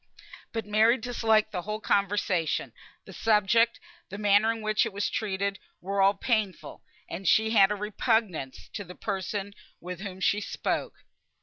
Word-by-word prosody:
But 225 -3 -3
Mary 220 +4 +4
disliked 220 -2 +1
the 180 -4 -3
whole 215 +4 -4
conversation; 195 -6 0 0.3
the - - -11
subject, 225 +2 +3 0.3
the 200 - -7
manner 205 +1 +4
in 225 -1 -6
which 215 0 +2
it - - -3
was 200 +1 -1
treated, 200 -1 -2 0.2
were 195 +2 -1
all 195 +1 +5
painful, 215 -3 -2 0.3
and 185 +2 -6
she 220 +6 +4
had 200 -4 +6
a 210 - -1
repugnance 210 - -1
to 205 - -4
the 180 -1 -11
person 200 0 -4 0.3
with 180 0 -7
whom 190 -2 -7
she 205 +2 +1
spoke. - - -3
205 Hz, 160 wpm, -27 LUFS, 195-220 Hz, 0.3 s, had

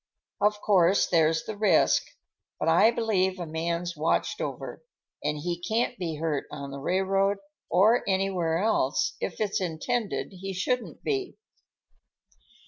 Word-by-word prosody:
Of 210 0 +2
course 190 -2 +4
there's 160 -1 +2
the 215 - -6
risk; 210 +1 +3 0.6
but - - -1
I 225 - +6
believe 200 -5 +1
a 175 - -4
man's 170 +2 -3
watched 155 +2 0
over, - - -5 0.4
and 150 - -1
he 170 +3 -3
can't 230 +6 0
be 165 -3 -3
hurt 150 -2 -2
on 140 0 -6
the 140 - -6
railroad 195 +5 +1 0.3
or 210 +7 +4
anywhere 190 -4 +1
else 220 - +1
if - - -4
it's 210 -1 0
intended 200 +6 -2
he 195 0 -5
shouldn't 250 +7 -2
be." 395 -2 -2
190 Hz, 135 wpm, -27 LUFS, 165-210 Hz, 0.6 s, I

